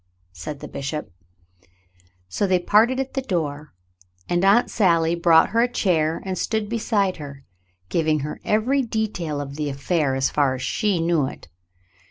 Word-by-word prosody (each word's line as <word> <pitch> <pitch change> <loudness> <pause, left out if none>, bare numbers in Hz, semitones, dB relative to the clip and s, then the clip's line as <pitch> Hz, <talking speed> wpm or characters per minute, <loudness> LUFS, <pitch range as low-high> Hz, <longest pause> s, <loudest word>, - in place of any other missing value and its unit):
^" - - -45 0.3
said 135 - -8
the - - -7
bishop. 145 - -5 1.2
So 95 - -1
they 185 -1 +3
parted 220 +8 +3
at 270 0 -3
the 270 - -1
door, 150 - -3 0.6
and 175 +1 0
Aunt 200 +5 +4
Sally 170 -5 +2
brought 170 -1 +4
her 230 +2 +2
a 245 +1 +1
chair 165 -8 0
and 190 -1 -3
stood 220 -2 -1
beside 215 -4 0
her, 140 -3 -9 0.4
giving 155 - +1
her 150 +2 -6
every 245 +6 +1
detail 215 - -2
of 140 0 -6
the 150 -1 -2
affair 140 0 0
as 135 0 0
far 140 -3 +2
as 130 - -6
she 200 - 0
knew 165 -4 +1
it. - - -10
170 Hz, 170 wpm, -23 LUFS, 145-210 Hz, 1.2 s, Aunt